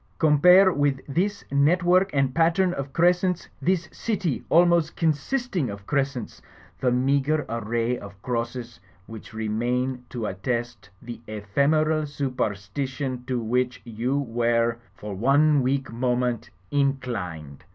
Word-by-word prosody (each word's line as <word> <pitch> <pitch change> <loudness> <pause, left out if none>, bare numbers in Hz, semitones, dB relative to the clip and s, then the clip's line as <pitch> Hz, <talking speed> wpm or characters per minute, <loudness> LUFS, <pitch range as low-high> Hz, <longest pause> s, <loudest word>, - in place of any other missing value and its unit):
Compare 180 +5 +6
with 145 -2 +1
this 190 +8 -1
network 175 +6 +3
and 135 -2 +1
pattern 170 +3 +2
of 140 -3 -5
crescents, 180 +2 +2
this 175 -3 +1
city 195 - -2
almost 170 -1 +4
consisting 165 - -1
of 100 -1 -8
crescents, 135 -3 -2 0.4
the 125 - +1
meagre 140 +4 +1
array 115 +1 -1
of 100 -1 -11
crosses, 120 0 -4 0.3
which 110 -1 -10
remain 120 +4 -2
to 120 -3 -4
attest 120 +2 -3
the 120 -1 -8
ephemeral 150 +9 +1
superstition 130 0 -3
to 125 -1 -1
which 125 +2 -1
you 120 +4 -2
were, 120 -2 +1 0.2
for 105 -1 -7
one 140 +7 +3
weak 135 +1 -1
moment, 125 -1 -1 0.2
inclined." 120 - -2
130 Hz, 120 wpm, -25 LUFS, 115-155 Hz, 0.4 s, Compare